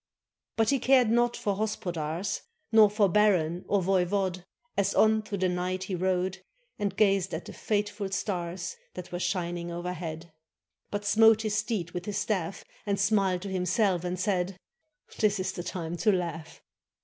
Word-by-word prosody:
But 225 +2 +3
he 275 - +2
cared 255 -2 +4
not 240 +1 +2
for 200 -2 -1
hospodars, 180 -3 -2 0.3
Nor 220 -2 +7
for 205 0 +3
baron 180 -4 +2
or 200 -2 +2
voivode, 185 0 +1 0.3
As 200 -1 +1
on 220 0 +4
through 215 -1 -5
the 185 0 +1
night 180 +1 -2
he 190 - -5
rode 185 +1 -1 0.4
And 200 -2 -2
gazed 195 -4 +2
at 160 - -6
the - - -9
fateful 205 -1 -2
stars 180 -2 -3 0.2
That 180 -1 -8
were 175 - -3
shining 175 -1 -2
overhead; 170 -2 -5 0.6
But 205 0 -4
smote 220 +1 +5
his 215 -1 -1
steed 205 -6 -1
with 175 0 -5
his 205 -1 -3
staff, 195 -3 -2 0.2
And 200 -1 0
smiled 195 -3 +2
to 200 - -5
himself, 185 0 +1
and 180 0 -3
said: 185 -1 0 0.6
"This 210 -2 +2
is 185 - -1
the 175 - -5
time 175 -1 -4
to 215 +4 +3
laugh." 165 -3 -4
190 Hz, 165 wpm, -28 LUFS, 180-205 Hz, 0.6 s, Nor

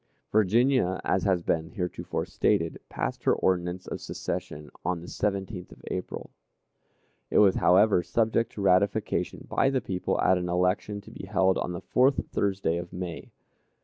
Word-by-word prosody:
Virginia, 110 -1 +3
as 95 - +1
has 95 -3 +2
been 80 -1 0
heretofore 90 -5 -3
stated, 85 0 0
passed - - -3
her - - +5
ordinance 90 0 0
of - - -6
secession 75 0 -5
on 90 0 -1
the - - -10
17th 95 -1 -3
of - - -15
April. 90 - -5 1.0
It - - +1
was, 100 -3 +6
however, 95 0 +5
subject 115 +4 +1
to 105 - -6
ratification 100 +3 +1
by 135 - +2
the 135 -1 +1
people 95 -6 -2
at 95 -1 +3
an 90 0 -3
election 90 +3 0
to - - -14
be 95 - -9
held 95 -1 +2
on 90 - -2
the 85 - -5
fourth 130 +2 +2
Thursday 95 -4 0
of 85 0 -6
May. 90 -2 -6
95 Hz, 160 wpm, -27 LUFS, 90-105 Hz, 1.0 s, was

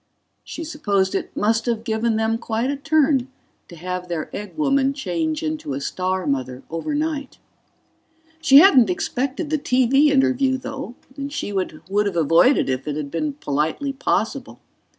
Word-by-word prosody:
She 330 - -7
supposed 205 - 0
it - - -4
must 225 +3 +1
have 230 -2 -1
given 225 0 0
them 220 +1 0
quite 235 +3 -1
a - - -2
turn 285 -3 +2 0.4
to 170 - -12
have 180 +2 -5
their 170 -3 -4
egg 210 +7 -7
woman 275 -2 +2
change 170 - -2
into 155 -3 -3
a - - -3
star 185 +5 -2
mother 130 -2 -2
overnight. 290 - -3 1.0
She 275 -4 +7
hadn't 275 - +7
expected 270 - -2
the 310 - +1
TV 260 +2 +3
interview, 265 -1 +2
though, 265 -1 -7 0.2
and 280 0 -5
she 205 - -4
would 185 -5 -3 0.2
have 185 -4 -3
avoided 165 - +4
it - - 0
if 135 - -22
it 150 - -2
had 150 -2 -5
been 295 - -2
politely 160 - -2
possible. 275 - -2
230 Hz, 160 wpm, -22 LUFS, 175-275 Hz, 1.0 s, She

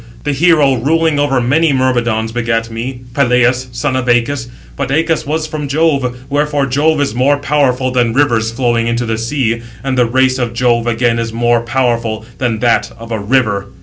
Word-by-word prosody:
The 145 - -1
hero 145 -3 +3
ruling 160 +4 +1
over 140 -2 +1
many 145 +6 +2
Myrmidons 120 -4 0
begat 115 -1 -1
me, 125 +3 -5
Peleus, 125 -1 +2
son 130 +3 -2
of 130 -1 -2
Æacus; 120 +1 +1 0.3
but 140 -2 -3
Æacus 160 +2 0
was 155 +1 -1
from 155 -2 -5
Jove; 135 -4 0
wherefore 145 0 0
Jove 145 +4 +1
is 140 -6 0
more 135 +4 +2
powerful 135 -3 0
than 120 -2 +1
Rivers 115 -4 +1
flowing 120 -1 0
into 120 +1 -1
the 110 -1 -2
sea, 115 -1 -1 0.2
and 135 -1 -1
the 125 -2 +2
race 130 +2 +1
of 120 -2 -2
Jove 120 -1 +1
again 120 0 +1
is 115 -1 -3
more 120 +1 +1
powerful 115 -3 -1
than 120 -4 0
that 120 -1 +1
of 115 0 -10
a 110 - -2
river. 100 -3 0
125 Hz, 180 wpm, -14 LUFS, 115-140 Hz, 0.3 s, hero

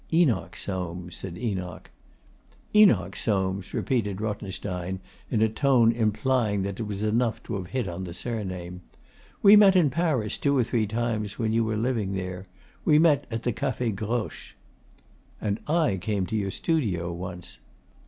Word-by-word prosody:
'Enoch 160 - +2
Soames,' 90 -2 -4
said 90 -2 -7
Enoch. 90 -8 -4 0.8
'Enoch 110 - +5
Soames,' 95 -2 -1
repeated 105 -7 -1
Rothenstein 95 -3 -4 0.3
in 110 -2 +2
a - - +5
tone 120 0 +4
implying 110 -2 +1
that 100 +1 -4
it 115 - -2
was 100 0 -4
enough 115 +2 0
to - - -6
have 95 -3 -3
hit 125 +1 -2
on 90 +1 -5
the 85 - -7
surname. 95 -7 -5 0.6
'We 205 +1 +9
met 200 -2 +7
in 165 -7 +4
Paris 145 -9 0
two 140 -1 +2
or 125 - +4
three 115 -2 0
times 110 -2 -2
when 110 -2 0
you 115 0 +3
were 110 -1 -1
living 110 -4 -1
there. 95 0 -4 0.4
We 150 - +5
met 155 -2 +4
at 115 0 -4
the 120 - 0
Cafe 125 -4 -1
Groche.' 110 +3 -4 0.8
'And 105 -1 -1
I 155 - +2
came 100 +1 -1
to 110 - -4
your 100 -2 0
studio 95 - -1
once. 90 -5 -7
110 Hz, 160 wpm, -26 LUFS, 95-125 Hz, 0.8 s, We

